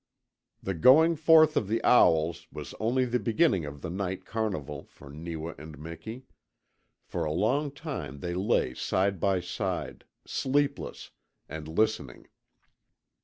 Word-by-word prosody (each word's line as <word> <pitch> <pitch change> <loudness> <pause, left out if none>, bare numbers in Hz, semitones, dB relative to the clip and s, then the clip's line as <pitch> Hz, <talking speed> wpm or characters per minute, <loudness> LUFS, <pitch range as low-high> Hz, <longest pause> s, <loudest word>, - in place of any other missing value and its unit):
The 95 - -2
going 150 - +6
forth 155 0 +6
of 105 - +1
the 115 +3 0
owls 85 -8 +4
was - - -8
only 125 +4 +1
the 125 0 0
beginning 110 - +2
of 70 -1 -8
the 85 - -4
night 95 0 -3
carnival 95 - -3
for 70 - -14
Neewa 80 +1 -6
and 75 0 -10
Miki. 95 - -8 0.8
For 85 - -4
a 75 - -1
long 125 - +1
time 135 - -6
they 85 +4 -4
lay 95 - +1
side 95 +6 0
by 95 0 +1
side, 90 +1 -4 0.2
sleepless, 140 +1 -1 0.4
and 80 +1 -7
listening. 80 - -1
95 Hz, 135 wpm, -28 LUFS, 80-125 Hz, 0.8 s, going